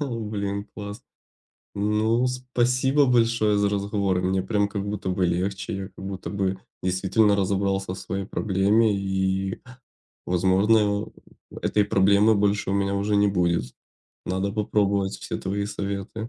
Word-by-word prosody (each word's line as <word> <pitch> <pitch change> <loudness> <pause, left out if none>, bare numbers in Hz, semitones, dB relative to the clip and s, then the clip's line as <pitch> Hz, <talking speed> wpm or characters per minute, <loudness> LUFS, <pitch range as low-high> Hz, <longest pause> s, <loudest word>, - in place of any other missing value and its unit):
О, 125 -6 -3
блин, 100 -1 -3
класс! 105 +3 -7 0.7
Ну, 110 +4 +1
спасибо 125 +2 +1
большое 115 -3 +3
за 100 0 +2
разговор, 100 -2 0
мне 95 +1 0
прям 100 +1 0
как 100 -1 -4
будто 100 -2 -4
бы 90 0 0
легче, 95 +3 -2
я 95 0 -5
как 95 0 -12
будто 95 -1 -5
бы 95 -1 -1 0.2
действительно 95 +3 +2
разобрался 95 -1 0
в - - -9
своей 95 0 -4
проблеме 105 +2 +2
и, 95 0 -1 0.6
возможно, 100 +4 +2 0.4
э, - - -13
этой 105 -1 +2
проблемы 100 +2 +4
больше 100 -1 +1
у - - 0
меня 100 0 0
уже 100 +1 0
не 100 0 +4
будет. 85 -9 0 0.5
Надо 95 +2 -1
попробовать 100 -2 0
все - - -5
твои 100 +1 -2
советы. 100 +2 -4
100 Hz, 145 wpm, -24 LUFS, 95-105 Hz, 0.7 s, проблемы